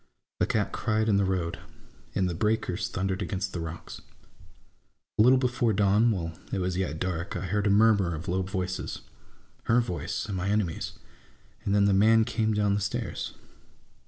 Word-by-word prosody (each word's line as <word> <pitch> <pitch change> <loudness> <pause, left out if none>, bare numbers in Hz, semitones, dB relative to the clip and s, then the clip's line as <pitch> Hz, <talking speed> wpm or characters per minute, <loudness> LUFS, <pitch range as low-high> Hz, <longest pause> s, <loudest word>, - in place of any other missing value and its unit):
A - - +2
cat - - 0
cried 110 0 0
in 105 -2 +4
the 100 - +2
road, 90 -3 -1 0.6
and 95 - +2
the 90 - -2
breakers 105 0 0
thundered 95 -1 -2
against 95 -1 -3
the 85 - -3
rocks. 80 0 -7 1.2
A - - +8
little 125 +4 +7
before 125 -3 +1
dawn, 105 +4 +4
while 85 -6 -2 0.2
it - - -1
was 90 -1 -1
yet 90 -3 -2
dark, 90 0 -3
I - - -4
heard 105 +3 0
a - - +3
murmur 100 -4 +4
of 80 +3 -7
lovv 95 +1 -1
voices 95 -1 -3 0.3
— - - -33
her 115 +1 +4
voice 90 -8 -2
and 100 - -4
my 95 +2 -1
enemy's; 100 -6 -1 0.7
and 100 - +1
then 100 -1 +4
the 100 - +4
man 110 +3 +5
came 110 0 0
down 105 -1 +2
the 100 - 0
stairs. 105 +2 -3
100 Hz, 185 wpm, -28 LUFS, 90-110 Hz, 1.2 s, A